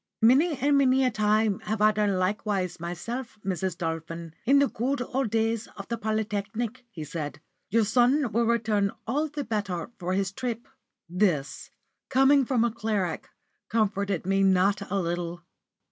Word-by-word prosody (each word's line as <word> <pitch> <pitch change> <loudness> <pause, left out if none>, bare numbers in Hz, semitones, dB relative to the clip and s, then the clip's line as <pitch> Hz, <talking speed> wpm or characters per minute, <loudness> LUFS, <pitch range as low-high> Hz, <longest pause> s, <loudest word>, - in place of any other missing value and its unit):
"Many 280 +7 +5
and 280 +2 +3
many 265 -1 +4
a 250 - +2
time 215 -1 +2
have 215 0 -3
I 215 0 +5
done 205 -2 +1
likewise 185 -1 -1
myself, 225 +9 -5
Mrs. 185 -2 -2
Dolphin, 165 -1 -4
in 275 +4 +5
the 280 0 +5
good 265 +4 -2
old 250 0 -1
days 225 +1 0
of 200 - -8
the 235 - -1
Polytechnic," 215 +3 -2
he 170 -9 -7
said. 150 -1 -5 0.3
"Your 225 -1 +3
son 250 +3 +3
will 230 0 +1
return 215 -4 +1
all 290 +7 0
the 295 0 -4
better 205 -5 -3
for 180 0 -2
his 195 0 0
trip." 235 +2 -4 0.4
This, 175 -6 0 0.4
coming 270 +1 +5
from 240 -2 +2
a 235 - +1
cleric, 210 -6 -2 0.4
comforted 200 -4 0
me 195 +1 +2
not 195 +1 +3
a 200 +1 0
little. 175 0 -3
215 Hz, 160 wpm, -27 LUFS, 185-240 Hz, 0.4 s, Many